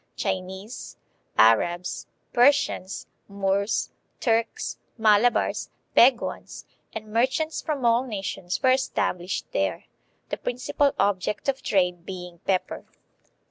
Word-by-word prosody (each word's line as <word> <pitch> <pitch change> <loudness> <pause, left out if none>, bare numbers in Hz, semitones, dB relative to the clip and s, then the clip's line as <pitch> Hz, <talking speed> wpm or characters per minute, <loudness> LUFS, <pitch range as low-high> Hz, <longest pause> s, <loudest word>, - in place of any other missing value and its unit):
"Chinese, 190 +5 -4 0.4
Arabs, 175 +11 +3 0.3
Persians, 255 -6 +2 0.2
Moors, 200 +1 0 0.3
Turks, 230 -2 0 0.2
Malabars, 220 +2 +3 0.3
Peguans, 245 0 +3 0.3
and 215 -1 -8
merchants 260 +7 +1
from 285 -5 -2
all 235 +3 +3
nations 195 -4 -4
were 260 - +6
established 185 -8 -1
there," - - -1 0.4
the - - -2
principal 255 +3 0
object 200 +2 0
of 275 -1 0
trade 180 -3 +1
being 180 -2 -8
pepper. 190 -2 0
210 Hz, 100 wpm, -25 LUFS, 185-250 Hz, 0.4 s, were